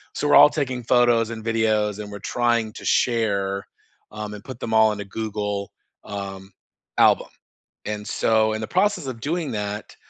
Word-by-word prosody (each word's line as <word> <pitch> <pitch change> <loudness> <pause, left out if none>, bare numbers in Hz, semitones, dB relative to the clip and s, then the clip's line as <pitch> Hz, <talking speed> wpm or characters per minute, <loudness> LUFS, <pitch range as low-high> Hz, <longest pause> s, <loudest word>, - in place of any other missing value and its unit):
so 150 - -1
we're - - +5
all - - +9
taking 130 -5 -3
photos 120 -1 +3
and 110 -1 -7
videos, 110 -2 +1
and 105 -1 -7
we're 100 - -7
trying 120 +1 0
to - - -10
share, 100 -4 +1 0.4
um, 105 0 -6
and 105 - -11
put 130 -3 -9
them 110 - -4
all 110 0 +6
in 105 - -8
a - - -6
Google, 105 -1 -4 0.3
um, 95 -1 -7 0.5
album. - - +4 0.6
And, 105 -1 -4
so, 110 -1 +2
in 110 - -3
the 110 - -4
process 185 -4 +1
of 120 -3 -6
doing 155 0 -2
that, 105 0 -5
110 Hz, 180 wpm, -23 LUFS, 105-120 Hz, 0.6 s, all